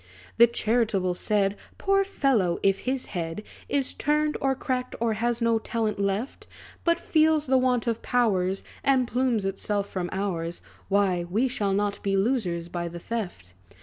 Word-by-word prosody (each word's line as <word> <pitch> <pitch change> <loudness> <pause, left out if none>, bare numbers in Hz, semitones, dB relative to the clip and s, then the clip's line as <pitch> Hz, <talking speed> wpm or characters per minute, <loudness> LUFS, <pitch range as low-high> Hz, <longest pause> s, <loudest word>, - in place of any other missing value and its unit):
The 235 +1 +8
charitable 220 -5 +1
said, 200 +2 +1 0.2
"Poor 390 0 +2
fellow! 260 - +1
if 195 0 +3
his 260 -1 -1
head 170 +2 -3 0.3
Is 275 -2 0
turned, 300 +1 +1
or 270 -1 +2
cracked, 255 -1 -3
or 230 -1 +1
has 235 +2 -1
no 230 -1 +3
talent 220 -2 -2
left; 200 +6 -2 0.4
But 335 0 +2
feels 310 -1 +3
the 265 0 +3
want 250 -2 +1
of 230 -1 -1
powers, 195 -6 +1 0.2
And 260 -3 +3
plumes 245 -5 0
itself 200 +1 -1
from 180 -3 -3
ours, 175 -4 -3 0.3
Why, 195 -3 +2
we 225 +8 +2
shall 205 -6 -1
not 205 0 -1
be 195 -1 0
losers 195 -6 0
by 175 0 -4
the 170 0 -7
theft." 175 - -5
220 Hz, 160 wpm, -26 LUFS, 195-255 Hz, 0.4 s, The